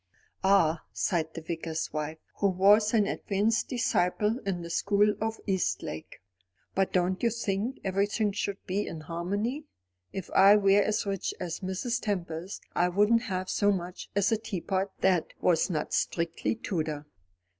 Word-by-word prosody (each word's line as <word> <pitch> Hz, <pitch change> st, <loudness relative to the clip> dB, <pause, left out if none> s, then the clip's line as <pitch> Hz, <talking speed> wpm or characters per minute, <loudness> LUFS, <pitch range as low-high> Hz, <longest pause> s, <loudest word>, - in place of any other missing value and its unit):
"Ah," 180 Hz, -5 st, +4 dB
sighed 165 Hz, -4 st, -1 dB
the 165 Hz, -, -5 dB
Vicar's 165 Hz, -1 st, -4 dB
wife, 155 Hz, +1 st, -3 dB, 0.2 s
who 200 Hz, -, +2 dB
was 205 Hz, +3 st, +5 dB
an 215 Hz, -3 st, +3 dB
advanced 210 Hz, +4 st, 0 dB
disciple 215 Hz, -2 st, +1 dB
in 175 Hz, -3 st, -1 dB
the 170 Hz, -, -7 dB
school 205 Hz, +3 st, +3 dB
of 220 Hz, 0 st, -2 dB
Eastlake, 95 Hz, -, -2 dB, 0.5 s
"but 195 Hz, 0 st, +1 dB
don't 185 Hz, +1 st, +1 dB
you 235 Hz, -, +3 dB
think 225 Hz, +2 st, -2 dB
everything 205 Hz, +2 st, +1 dB
should 200 Hz, 0 st, -2 dB
be 200 Hz, +3 st, -1 dB
in 160 Hz, -, -6 dB
harmony? 200 Hz, -, -3 dB, 0.5 s
If 190 Hz, -, -6 dB
I 195 Hz, +2 st, +7 dB
were 200 Hz, 0 st, +5 dB
as 215 Hz, +1 st, 0 dB
rich 195 Hz, -2 st, -2 dB
as 170 Hz, -2 st, -4 dB
Mrs. 215 Hz, +6 st, -2 dB
Tempest, 180 Hz, -3 st, -3 dB
I 175 Hz, +1 st, +3 dB
wouldn't 210 Hz, +5 st, +3 dB
have 185 Hz, -6 st, -3 dB
so 205 Hz, +1 st, +2 dB
much 180 Hz, -2 st, -4 dB
as 200 Hz, +1 st, +2 dB
a 225 Hz, -, +3 dB
teapot 195 Hz, -2 st, -2 dB
that 185 Hz, -3 st, +3 dB
was 170 Hz, 0 st, +2 dB
not 155 Hz, -4 st, -2 dB
strictly 170 Hz, +5 st, 0 dB
Tudor." 155 Hz, -8 st, -3 dB
195 Hz, 155 wpm, -29 LUFS, 175-210 Hz, 0.5 s, I